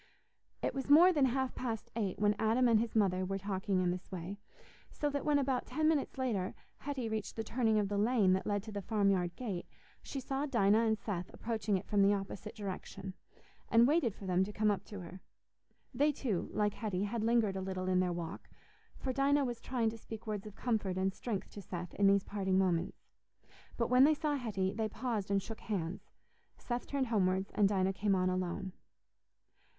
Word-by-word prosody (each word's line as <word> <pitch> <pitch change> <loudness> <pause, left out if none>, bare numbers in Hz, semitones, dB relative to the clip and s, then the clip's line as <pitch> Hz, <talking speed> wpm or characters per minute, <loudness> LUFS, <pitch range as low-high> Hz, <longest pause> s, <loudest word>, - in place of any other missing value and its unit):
It - - 0
was 270 0 -4
more 345 +6 +8
than 290 -4 +4
half 265 0 0
past 230 -4 -4
eight 205 -5 -1
when 205 0 +3
Adam 230 +3 +3
and 230 -2 +5
his 230 0 -2
mother 190 -4 +2
were 195 +1 -2
talking 195 -1 -1
in 180 -1 +2
this 180 +2 -6
way, 185 +2 -5 0.5
so 295 -1 -2
that 285 0 -2
when, 295 -1 +3
about 265 -2 0
ten 310 +5 +1
minutes 305 -3 +1
later, 220 -8 -1 0.2
Hetty 270 -4 -3
reached 220 -2 -3
the 225 - -2
turning 225 -1 +1
of 205 -1 +2
the 200 0 -1
lane 210 -4 +4
that 190 - -1
led 205 -1 0
to 220 - -8
the 205 -1 -4
farmyard 195 -4 +1
gate, 200 -8 -4 0.3
she 275 - -5
saw 270 +3 -2
Dinah 225 -3 +3
and 220 0 +2
Seth 185 -5 -4
approaching 220 -3 -1
it 185 - -7
from 205 -2 +2
the 200 +1 +5
opposite 200 +2 -6
direction, 195 -2 -6 0.6
and 230 +1 +6
waited 280 - +2
for 200 - -10
them 185 0 +2
to 200 - -4
come 210 0 +2
up 200 - -2
to 205 -3 -8
her. 180 +2 -10 0.7
They, 290 +5 +3
too, 240 -10 -2
like 210 -1 +1
Hetty, 200 -4 -2
had 215 +2 -2
lingered 225 -4 +2
a 190 - -2
little 185 -1 -3
in 185 0 +3
their 180 -1 +1
walk, 170 -1 -6 0.5
for 260 - -3
Dinah 280 +1 +3
was 240 -2 -4
trying 235 -4 0
to 225 - -9
speak 220 +1 -9
words 210 -1 -4
of 210 - -11
comfort 210 -6 -1
and 190 0 +1
strength 205 -4 -4
to 205 - -8
Seth 180 -1 -6
in 200 - +3
these 200 0 +4
parting 190 -2 0
moments. 180 -2 0 0.7
But 235 0 0
when 250 +1 +7
they 310 +1 +4
saw 300 0 -1
Hetty, 205 -8 -1
they 220 0 -1
paused 220 -3 -3
and 200 -1 +1
shook 225 +2 -7
hands; 185 -4 -4 0.5
Seth 240 0 -4
turned 280 -2 0
homewards, 190 -3 +1
and 205 -2 +4
Dinah 190 -1 +1
came 200 0 +1
on 185 0 +2
alone. 185 +1 -3
210 Hz, 205 wpm, -33 LUFS, 190-240 Hz, 0.7 s, more